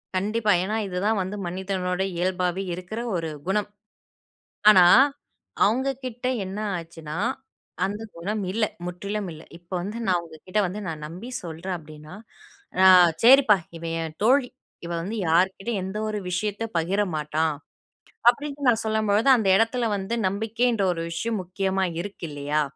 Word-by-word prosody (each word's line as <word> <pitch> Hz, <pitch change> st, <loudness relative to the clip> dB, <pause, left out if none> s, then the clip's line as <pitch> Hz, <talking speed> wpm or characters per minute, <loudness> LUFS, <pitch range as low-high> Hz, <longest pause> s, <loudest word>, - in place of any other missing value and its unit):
கண்டிப்பா, 210 Hz, +3 st, +1 dB
ஏன்னா 210 Hz, +3 st, -2 dB
இது 180 Hz, -, -5 dB
தான் 220 Hz, -1 st, +2 dB
வந்து 190 Hz, +2 st, -4 dB
மனிதனோட 185 Hz, 0 st, -2 dB, 0.2 s
இயல்பாவே 180 Hz, +1 st, 0 dB
இருக்குற 185 Hz, +5 st, -6 dB, 0.2 s
ஒரு 165 Hz, -2 st, -2 dB, 0.2 s
குணம். 205 Hz, +2 st, 0 dB, 1.0 s
ஆனா 185 Hz, -4 st, +8 dB, 0.8 s
அவுங்ககிட்ட 255 Hz, +1 st, -1 dB, 0.2 s
என்ன 195 Hz, +3 st, -5 dB, 0.2 s
ஆச்சுன்னா, 165 Hz, -1 st, -8 dB, 0.7 s
அந்த 205 Hz, +3 st, -4 dB
குணம் 205 Hz, +6 st, -3 dB
இல்ல! 215 Hz, +1 st, +1 dB, 0.2 s
முற்றிலும் 200 Hz, +2 st, -4 dB
இல்ல. 155 Hz, +1 st, -12 dB
இப்ப 175 Hz, +1 st, -29 dB
வந்து 205 Hz, +5 st, -5 dB
நான் 180 Hz, -2 st, +2 dB
உங்க 160 Hz, -1 st, -12 dB
கிட்ட 200 Hz, +3 st, 0 dB
வந்து 200 Hz, +4 st, -5 dB
நான் 155 Hz, -2 st, -5 dB
நம்பி 185 Hz, +10 st, -9 dB
சொல்றேன் 170 Hz, +3 st, -5 dB
அப்டின்னா, 155 Hz, +1 st, -12 dB, 0.7 s
"அ -, -, +8 dB, 0.4 s
சரிப்பா, 255 Hz, -4 st, +7 dB, 0.2 s
இவ 165 Hz, -, -12 dB, 0.2 s
என் 160 Hz, -1 st, -5 dB
தோழி! 255 Hz, +2 st, +4 dB, 0.4 s
இவ 170 Hz, -, -5 dB
வந்து 205 Hz, +6 st, -4 dB
யார்க்கிட்டயும் 190 Hz, +5 st, +1 dB
எந்த 190 Hz, +2 st, -5 dB
ஒரு 215 Hz, -1 st, -2 dB
விஷயத்த 205 Hz, +4 st, -2 dB
பகிரமாட்டா." 160 Hz, -4 st, 0 dB, 0.8 s
அப்படின்னு 285 Hz, +2 st, -2 dB
நான் 230 Hz, -2 st, +2 dB
சொல்லும்பொழுது, 220 Hz, +2 st, +2 dB
அந்த 220 Hz, -5 st, 0 dB
இடத்துல 230 Hz, +3 st, +2 dB
வந்து 195 Hz, +4 st, -3 dB
நம்பிக்கைன்ற 225 Hz, +3 st, 0 dB
ஒரு 165 Hz, -, -5 dB
விஷயம் 215 Hz, +6 st, -2 dB
முக்கியமா 190 Hz, +1 st, -1 dB, 0.2 s
இருக்கு 200 Hz, -2 st, -7 dB
இல்லையா? 145 Hz, +1 st, -1 dB
195 Hz, 140 wpm, -25 LUFS, 175-220 Hz, 1.0 s, ஆனா